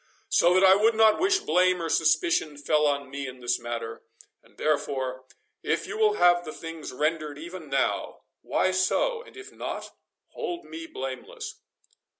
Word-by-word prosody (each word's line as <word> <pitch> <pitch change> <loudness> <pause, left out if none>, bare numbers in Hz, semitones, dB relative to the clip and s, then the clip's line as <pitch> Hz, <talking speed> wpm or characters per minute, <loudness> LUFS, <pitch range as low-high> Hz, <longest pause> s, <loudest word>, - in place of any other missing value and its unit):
So 175 +1 +4
that 185 - +5
I 190 0 +8
would 220 +3 +3
not 220 -1 +5
wish 385 +2 +3
blame 180 - +2
or 165 - -2
suspicion 155 -1 +2
fell 150 +1 +2
on 140 -2 -1
me 140 0 -4
in 130 0 -9
this 125 0 0
matter. 120 0 -5 0.4
And, - - -26
therefore, 130 -4 -1 0.4
if - - -1
you - - -6
will 435 -1 +3
have 175 - +4
the 155 - -6
things 165 -1 -7
rendered 150 +1 -1
even 170 0 -9
now,—why 135 +6 -1
so—and 460 - 0
if 400 +2 -10
not, - - -6 0.4
hold 350 0 -5
me 330 0 -8
blameless." 130 - -7
165 Hz, 155 wpm, -27 LUFS, 140-195 Hz, 0.4 s, I